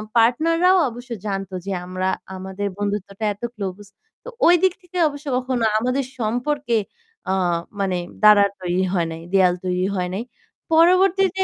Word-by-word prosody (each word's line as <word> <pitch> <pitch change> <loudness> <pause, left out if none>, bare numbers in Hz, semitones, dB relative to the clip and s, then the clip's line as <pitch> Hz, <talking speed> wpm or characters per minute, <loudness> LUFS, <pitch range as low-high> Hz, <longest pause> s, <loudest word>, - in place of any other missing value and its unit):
পার্টনাররাও 330 +11 +4
অবশ্য 245 +2 -11
জানত 195 -2 -3
যে 200 - -3
আমরা 185 +1 -2 0.3
আমাদের 190 +2 -4
বন্ধুত্বটা 205 0 -3
এত 205 - -21
ক্লোজ 195 -2 -5 0.4
তো - - -8 0.2
ঐদিক 355 +1 +5
থেকে 360 0 -9
অবশ্য 285 +1 -10
কখনো 255 -2 -1 0.2
আমাদের 255 +3 -1
সম্পর্কে 245 +2 0 0.5
আ - - +2 0.5
মানে 190 -2 0 0.3
দাঁড়ার 205 -1 +7
তৈরি 180 +1 0
হয় 170 -3 +1
নাই। 160 0 -7
দেওয়াল 180 -2 +4
তৈরি 180 0 0
হয় 180 -1 -1
নাই। 215 +5 -3 0.5
পরবর্তীতে 375 +3 +4
220 Hz, 140 wpm, -22 LUFS, 190-295 Hz, 0.5 s, দাঁড়ার